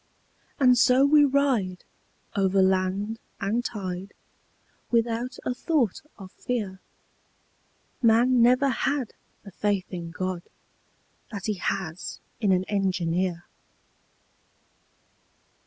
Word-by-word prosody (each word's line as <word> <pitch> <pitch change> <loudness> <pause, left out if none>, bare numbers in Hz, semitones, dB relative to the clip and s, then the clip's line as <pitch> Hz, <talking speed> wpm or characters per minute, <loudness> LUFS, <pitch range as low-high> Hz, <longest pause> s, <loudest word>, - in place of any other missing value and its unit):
And 250 -3 +5
so 260 +2 +5
we 295 0 +6
ride 260 -10 +1 0.5
Over 195 -1 +2
land 190 +4 0 0.2
and 215 +5 0
tide, 190 -4 -5 0.7
Without 235 +2 0
a 250 - 0
thought 255 - 0 0.2
of 190 -3 -11
fear 205 -7 -4 1.2
_Man 230 +2 +5
never 250 +4 +5
had 270 0 -1 0.3
The 200 - -11
faith 200 0 -1
in 170 -2 -5
God 185 +1 -3 0.9
That 200 -3 -6
he 215 - 0
has 175 -2 -3 0.2
in 205 -4 +2
an 185 0 +3
engineer! 185 -3 -1
205 Hz, 100 wpm, -26 LUFS, 185-245 Hz, 1.2 s, we